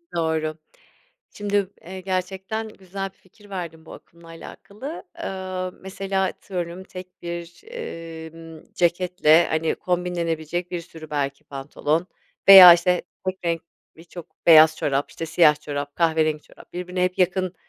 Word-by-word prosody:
Doğru. 160 -2 -1 0.8
Şimdi, 205 -1 0
eee, 185 +2 -8
gerçekten 190 +4 -3
güzel 195 -1 -6
bir - - -35
fikir 205 +2 -21
verdin 170 -4 -6
bu - - -11
akımla 170 0 -16
alakalı. 210 - -9
Eee, 185 - -4
mesela 190 0 -2
atıyorum 180 -1 -5
tek 185 -1 -12
bir, 170 - -7
emm, 165 - -9
ceketle 175 -2 +3
hani 160 0 0
kombinlenebilecek 175 -1 -2
bir 175 - -3
sürü 160 -2 -12
belki 140 0 -3
pantolon 145 +4 -2 0.4
veya 185 -3 +12
işte 180 +1 +1 0.2
tek 185 0 -2
renk 170 -1 -1 0.3
birçok 170 +1 -13
beyaz 160 -1 +8
çorap, 140 0 -1
işte 165 - -6
siyah 155 -2 +4
çorap, 145 -1 -5
kahverengi 160 -2 +1
çorap - - -18
birbirine 180 +1 -3
hep 180 0 -2
yakın, 185 0 +1
175 Hz, 130 wpm, -23 LUFS, 160-185 Hz, 0.8 s, veya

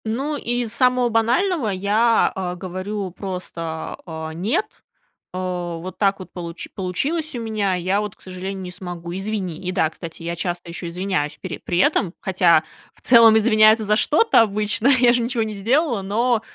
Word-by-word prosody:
Ну, 270 +7 -2
из 240 -4 -2
самого 250 -1 +3
банального 245 - +1
я, 210 +4 +2
э, 180 -2 -3
говорю 185 +2 -5
просто: 170 -4 -6
"Э, 160 -1 -6
нет, 200 - 0 0.7
э, - - -5
вот 180 -1 -4
так 195 -1 +2
вот 185 - -10
получ 170 -1 -6
получилось 280 - -2
у - - -3
меня, 215 -4 -1
я 185 +3 0
вот, 210 -2 -5
к - - -31
сожалению, 190 +1 -6
не 180 - -7
смогу, 175 -2 -7
извини". 195 -4 -3
И - - 0
да, 180 -4 +2
кстати, 165 0 -10
я 170 +1 -3
часто 175 0 -4
ещё 170 +1 -6
извиняюсь 175 -4 -2
пере - - -6
при 175 - -2
этом, 185 -1 +2
хотя 175 -4 +3 0.3
в - - -20
целом 230 -3 +7
извиняются 215 0 +5
за 210 +1 +3
что-то 310 - +4
обычно, 215 +2 0
я 250 -3 +5
же 245 - +1
ничего 235 -1 -1
не 215 -1 -4
сделала, 235 +4 +1
но, 225 +4 +1
200 Hz, 175 wpm, -21 LUFS, 180-230 Hz, 0.7 s, целом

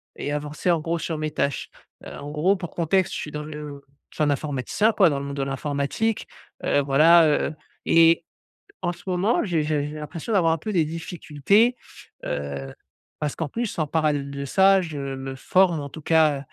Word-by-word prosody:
et 145 - -4
avancer 150 +4 -1
en 170 - +2
gros 165 +2 -2
sur 160 -2 -3
mes 155 0 -3
tâches. 140 -2 -2 0.4
Heu, - - -7
en 145 +1 -7
gros 170 +7 +2
pour 175 -3 -7
contexte 180 +3 +1
je - - -3
suis 150 - -6
dans 150 0 -5
le 150 -2 -8 0.3
je - - -19
suis 155 - +2
un 150 - +2
informaticien 145 - 0
quoi 195 -5 +5
dans 140 -2 -1
le 140 - -5
monde 140 0 -6
de 135 - 0
l'informatique, 140 - -2 0.4
heu, - - +2
voilà, 155 +4 +6
heu 150 +1 0 0.3
et 165 0 +5 0.6
en 175 -2 0
ce - - -16
moment 185 +5 +1
j'ai 170 -6 0
j'ai 150 -1 -1
j'ai 150 - -8
l'impression 155 +7 -6
d'avoir 170 -5 +4
un - - -1
peu 215 +7 -5
des 165 -4 +3
difficultés. 165 - +1 0.5
Heu, 70 -2 -4 0.5
parce 150 -2 -2
qu'en 160 -4 -3
plus 230 -6 -3
en 155 - 0
parallèle 150 -2 0
de 140 0 -5
ça 195 +4 +4
je 160 -4 -6 0.2
me 135 0 -6
forme 175 +4 +2
en 140 - -6
tout 155 - -10
cas, 155 -2 +3
155 Hz, 205 wpm, -24 LUFS, 145-175 Hz, 0.6 s, voilà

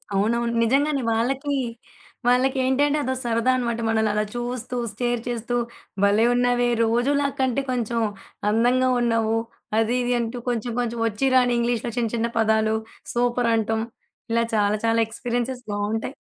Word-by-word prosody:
అవునవును. 235 +4 +1
నిజంగానే 275 +4 +2
వాళ్ళకి 270 +5 0 0.7
వాళ్ళకేంటంటే 265 +3 +2
అదో 260 -1 -1
సరదా 235 +1 +1
అన్నమాట. 235 -2 -1
మనల్ని 220 -1 +2
అలా 210 0 0
చూస్తూ 245 0 -4 0.2
స్టేర్ 240 +2 -1
చేస్తూ 240 0 -2 0.5
భలే 205 +3 +4
ఉన్నవే 245 0 +2
రోజులా 255 +5 +2
కంటే 260 0 +1
కొంచెం 235 -2 -1 0.5
అందంగా 245 +4 +3
ఉన్నావు. 225 -1 +1 0.4
అది 225 +1 +2
ఇది 245 0 +1
అంటూ 235 +1 -3
కొంచెం 240 0 -2
కొంచెం 235 -1 -2
ఒచ్చి 225 +5 0
రాని 250 -1 +4
ఇంగ్లీష్‌లో 235 0 -1
చిన్న 230 -2 0
చిన్న 230 0 0
పదాలు 220 0 +2 0.4
సూపర్ 240 0 +1
అంటం. 220 0 0 0.5
ఇలా 230 0 +3
చాలా 205 0 +2
చాలా 230 0 +2
ఎక్స్‌పీరియన్సెస్ 245 +2 -3
బావుంటాయి. 210 +4 -2
240 Hz, 135 wpm, -23 LUFS, 225-250 Hz, 0.7 s, భలే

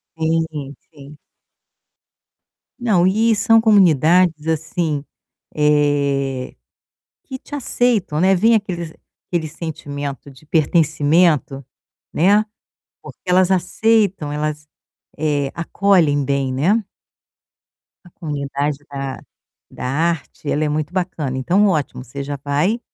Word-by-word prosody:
Sim, 160 -3 -2 0.2
sim. 145 -1 -14 1.6
Não, 205 -8 +2
e 220 +4 +3
são 225 +2 +4
comunidades, 175 - +4
assim, 160 -2 -1 0.5
eh, 140 -3 +1 0.7
que 265 - -7
te 290 - -9
aceitam, 240 - 0
né? 190 +3 +4
Vem 225 +5 +4
aqueles 175 -6 -3 0.3
aquele 170 -3 -2
sentimento 145 -3 -6
de 135 +3 -19
pertencimento, 155 -2 +2 0.5
né? 205 +6 +3 0.6
Porque - - -12
elas 185 0 +3
aceitam, 190 -2 +1
elas, 150 0 -3 0.5
eh, 145 -3 -1
acolhem 170 -4 +2
bem, 135 -1 -1
né. 190 - +1 1.2
A 175 - -15
comunidade 145 -3 -3
da 135 -1 -5 0.5
da - - -7
arte 155 +1 -2
ela 155 - 0
é 150 - 0
muito 150 +2 -3
bacana. 175 -8 -2
Então 180 +10 +2
ótimo, 150 -8 -1
você 135 +3 -7
já 140 +1 -5
vai 150 +11 0
155 Hz, 105 wpm, -19 LUFS, 145-185 Hz, 1.6 s, são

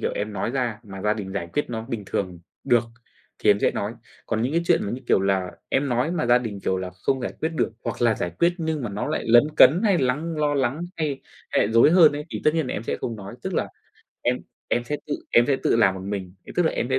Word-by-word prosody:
kiểu - - -1
em 105 +1 -3
nói 100 +3 -2
ra 120 -4 -1
mà 95 -2 -9
gia 105 0 +2
đình 95 -3 -6
giải 85 -4 -3
quyết 145 - -1
nó 110 -1 -3
bình 115 -5 -3
thường 90 -3 -3 0.3
được 120 -3 +4 0.6
thì - - +4
em 100 - +4
sẽ - - +3
nói. 100 +2 -3 0.3
Còn 110 -1 -1
những 125 +4 -1
cái 170 +1 +2
chuyện - - +4
mà, 100 - -3
như 125 - -4
kiểu - - +4
là, 95 -2 0 0.2
em 140 +1 +1
nói 125 +5 +1
mà 165 -6 -1
gia 120 +1 +5
đình, 110 -5 -5
kiểu 95 - 0
là, 95 0 -4
không 110 +9 -1
giải 120 - -3
quyết 160 - +1
được, 145 - 0
hoặc - - -3
là 115 -2 +4
giải 90 - -3
quyết 170 +1 +4
nhưng 160 -3 -2
mà 120 - -3
nó 100 +1 -3
lại - - -2
lấn 120 +3 +7
cấn 165 +7 +7
hay 200 -5 +4
lắng 150 +6 -1
lo 150 -1 +1
lắng 135 +2 0 0.2
hay 150 -4 -2 0.3
hay - - +3
lại - - -4
rối 115 +6 +6
hơn 165 -3 +7
ấy, 145 +1 -4
thì - - -4
tất 155 - +4
nhiên 160 -4 0
là - - -3
em 105 - -3
sẽ - - -2
không 115 - -3
nói, 100 +1 -9
tức 190 - -3
là - - 0 0.5
em - - +1 0.3
em 120 - 0
sẽ 150 +5 -2
tự 150 - -1 0.2
em, 120 - +6
sẽ 140 - +2
tự 135 - +1
làm 95 -5 +4
một 95 - -7
mình, 95 -2 -5
thì - - -9
tức 180 - +4
là, - - +1
em - - -1
sẽ 130 - +3
120 Hz, 285 wpm, -24 LUFS, 100-145 Hz, 0.6 s, lấn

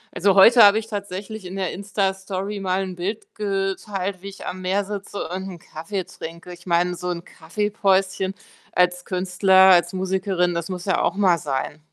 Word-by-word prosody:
Also, 195 +1 +3
heute 230 +5 +8
habe 205 +1 +7
ich 220 - -8
tatsächlich 205 0 -6
in 180 - -7
der 190 -2 -2
Insta-Story 195 0 -3
mal 190 0 0
'n 185 -1 -6
Bild 195 +5 -5
geteilt, 195 -1 -2
wie 200 - -7
ich 195 - -11
am 185 - -5
Meer 190 +2 0
sitze 205 0 -5
und 190 +1 -4
'n 175 -3 -9
Kaffee 180 +6 -5
trinke. 170 +2 -9
Ich 175 +1 -15
meine, 175 +1 +2
so 180 +1 -5
'n 170 -1 -4
Kaffee-Päuschen 195 +1 0 0.4
als 180 0 +2
Künstler, 190 +1 +4
als 175 -1 +4
Musikerin, 185 -1 0
das 170 +1 -3
muss 180 0 -5
ja 190 - +1
auch - - 0
mal 185 -4 +3
sein. 145 +1 -3
190 Hz, 180 wpm, -22 LUFS, 180-200 Hz, 0.4 s, heute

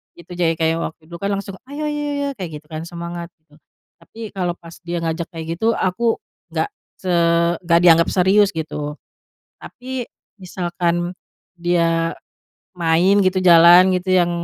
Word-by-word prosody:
gitu. 170 +1 -15
Jadi 170 -2 +1
kayak 165 0 +1
waktu 160 - -6
itu, 170 - -10
kan, 200 - -2
langsung, 195 -1 -6
"Ayo 290 +2 -6
ayo - - -1
ayo 295 - -2
ayo!" 285 0 -1
Kayak 180 -3 -5
gitu 150 - -30
kan, 155 0 -5
semangat 170 0 -6
gitu, 150 -2 -25 0.4
tapi 225 -1 -10
kalau 180 -3 -2
pas 165 -1 -13
dia 175 0 -2
ngajak 165 +1 -2
kayak 165 -1 -7
gitu, 225 +1 +2
aku 225 - 0 0.3
enggak - - -1 0.3
se 185 -1 -3 0.5
enggak 170 -1 +4
dianggap 170 -1 +6
serius 195 +2 +4
gitu. 150 -2 -4 0.7
Tapi, 255 -1 -6 0.4
misalkan 175 -1 -2 0.4
dia 165 -1 +1 0.7
main 170 +4 +3
gitu, 185 0 +2
jalan 175 +1 +7
gitu, 185 +1 -2
yang 175 -1 +3
175 Hz, 160 wpm, -20 LUFS, 165-190 Hz, 0.7 s, jalan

